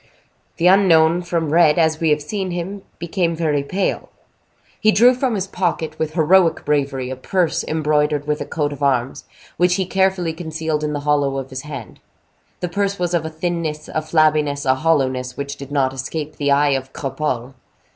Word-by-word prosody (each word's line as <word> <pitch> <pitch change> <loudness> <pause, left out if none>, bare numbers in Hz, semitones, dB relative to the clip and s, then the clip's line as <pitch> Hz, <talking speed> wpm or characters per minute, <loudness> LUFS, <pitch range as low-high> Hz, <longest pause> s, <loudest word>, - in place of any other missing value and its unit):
The 170 - 0
unknown, 175 -3 +5
from 165 -3 -2
red, 165 -2 +5
as 160 -1 +2
we 165 - +1
have 150 0 +1
seen 190 +4 -3
him, 180 +3 -4 0.2
became 170 0 -1
very 155 -3 0
pale. 185 +8 -2 0.7
He 215 - +4
drew 240 +4 +6
from 250 -2 -1
his 190 -2 -1
pocket, 165 -5 -2
with 155 -1 -2
heroic 170 +1 +3
bravery, 135 -3 -1
a - - -3
purse 175 +6 0
embroidered 150 -1 0
with 150 +1 -1
a - - -3
coat 145 -2 -2
of 145 - -11
arms, 135 -1 0 0.3
which 180 0 +3
he 190 -1 0
carefully 190 -2 +1
concealed 160 -2 -3
in 150 0 -1
the 145 - -3
hollow 145 -2 +1
of 135 0 -6
his 130 0 -5
hand. 135 -9 -9 0.6
This 180 - -3
purse 200 0 -1
was 175 -1 -2
of 165 -2 0
a - - -3
thinness, 160 -1 -3
a 155 - -2
flabbiness, 155 -2 +1
a 130 - +4
hollowness, 130 -4 0
which 140 0 -4
did 140 0 -10
not 135 -2 +1
escape 150 +4 -5
the 145 -1 0
eye 145 +1 +4
of 135 -1 -2
Cropole. 135 -2 -3
155 Hz, 185 wpm, -20 LUFS, 140-175 Hz, 0.7 s, drew